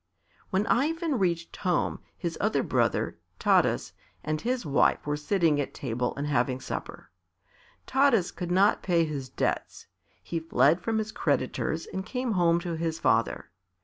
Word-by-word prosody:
When 195 +2 +1
Ivan 310 +2 +1
reached 170 -3 -1
home, 180 -3 0 0.2
his 170 -3 -3
other - - +1
brother, - - 0 0.2
Taras, - - +2 0.3
and 155 0 -2
his 250 -3 -1
wife 145 -1 +2
were 145 0 0
sitting 155 -1 +1
at 140 - -6
table 125 -1 -2
and 140 - -2
having 130 -2 +1
supper. - - -7 0.7
Taras 265 -9 +3
could 175 -2 -5
not 195 +4 +3
pay 170 -3 +2
his 140 -4 -5
debts; - - -2 0.4
he 170 - -3
fled 165 +1 +3
from 225 +4 -1
his 220 0 -2
creditors 155 - -1
and 190 - -5
came 250 +3 -3
home 170 -3 +3
to 170 -1 -3
his 160 0 -2
father. - - +1
170 Hz, 150 wpm, -28 LUFS, 150-205 Hz, 0.7 s, Taras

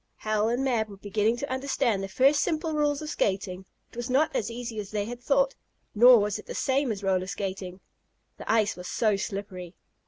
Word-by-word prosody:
Hal 215 0 0
and 245 +3 0
Mab 235 -5 0
were 200 - -11
beginning 210 +3 0
to 280 +1 -5
understand 260 -5 0
the 195 - -3
first 270 +8 +3
simple 320 -1 -1
rules 295 0 0
of 305 - -5
skating. 190 -1 -1 0.3
It - - -17
was 240 +1 -4
not 280 +5 +2
as 215 - -1
easy 230 -1 -5
as 200 -2 -6
they 205 -1 -2
had 240 +2 -7
thought 275 +1 +2 0.4
nor 245 +3 +8
was 210 -1 0
it - - -13
the - - -6
same 270 -1 +1
as 200 -2 -5
roller 185 -1 +1
skating. 190 -1 -5 0.6
The - - -3
ice 220 -2 +2
was 180 0 -8
so 215 -3 +1
slippery. 195 -3 -6
220 Hz, 210 wpm, -27 LUFS, 200-260 Hz, 0.6 s, nor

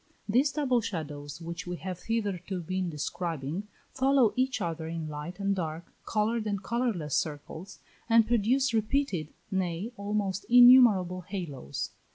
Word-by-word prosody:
These 260 +7 +2
double 260 -5 +1
shadows 150 -6 -5
which 170 +1 -6
we 180 - -3
have 185 -1 -6
hitherto 200 -5 -2
been 185 +1 -2
describing, 165 +3 -4 0.3
follow 265 -3 +3
each 260 -1 0
other 165 -4 -3
in 165 -1 -4
light 155 +5 -7
and 200 0 +1
dark, 165 -2 -5
coloured 220 +1 0
and 200 -1 -2
colourless 220 - -1
circles, 160 +5 -3 0.3
and 230 -1 +6
produce 240 +3 +2
repeated, 220 - 0 0.2
nay, 190 +3 -2
almost 200 -1 -2
innumerable 240 -7 +7
halos. 170 - -5
190 Hz, 135 wpm, -29 LUFS, 165-230 Hz, 0.3 s, innumerable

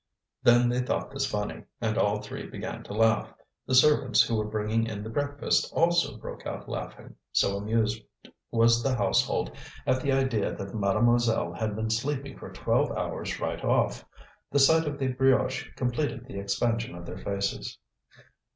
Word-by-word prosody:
Then 120 -1 +5
they 125 +1 +1
thought 125 - -2
this 135 0 -1
funny, 105 -3 -3
and - - -1
all - - +2
three - - -7
began - - -6
to - - -7
laugh; 110 +1 +2 0.4
the 130 - +2
servants 130 -3 +5
who 115 0 -1
were 105 -1 0
bringing 110 +1 0
in 105 -2 -5
the 110 - -6
breakfast 145 +2 0
also 170 +1 +2
broke - - -8
out - - -6
laughing, - - -7 0.2
so 100 - +2
amused 110 +1 0 0.5
was 115 0 +4
the 135 +1 +1
household 105 - +1 0.3
at 130 - +2
the 140 - 0
idea 130 -6 +1
that 100 0 -7
mademoiselle 115 +3 +2
had 110 -2 -2
been 110 +1 -2
sleeping 135 +3 -2
for - - -10
twelve - - +1
hours - - -3
right - - -3
off. - - +1 0.5
The 145 - 0
sight 160 +3 +5
of 145 -1 -3
the 135 -2 0
brioche 130 0 +2
completed 125 0 -2
the 110 -7 -7
expansion 115 +1 -1
of 85 0 -9
their 90 - -7
faces. 100 0 -3
115 Hz, 170 wpm, -28 LUFS, 105-135 Hz, 0.5 s, Then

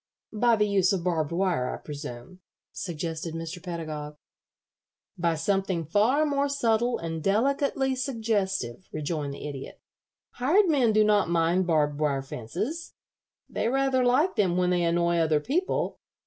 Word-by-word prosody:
"By 235 +2 +3
the 210 -1 +2
use 195 -3 +3
of 185 -3 -1
barbed 165 -4 0
wire, 175 -8 0
I - - -4
presume," 145 +2 -8 0.3
suggested 165 -2 -4
Mr. 165 +2 -6
Pedagog. 155 -4 -6 1.0
"By 170 -1 0
something 185 0 0
far 225 - +3
more 285 -1 +1
subtle 240 -3 +1
and 165 -1 -4
delicately 265 - +1
suggestive," 210 - -2
rejoined 150 -2 -3
the - - -7
Idiot. 140 -2 -8 0.5
"Hired 330 +12 +3
men 270 -8 +3
do 215 0 +4
not 210 -4 +3
mind 170 +2 +2
barbed 150 -3 +1
wire 140 -3 0
fences. 195 - -5 0.5
They - - -2
rather 270 0 +2
like 265 +9 +2
them 180 -4 +2
when 180 0 +2
they 175 -1 +2
annoy 170 0 +2
other 160 -2 +3
people. 320 - -1
180 Hz, 145 wpm, -27 LUFS, 160-240 Hz, 1.0 s, do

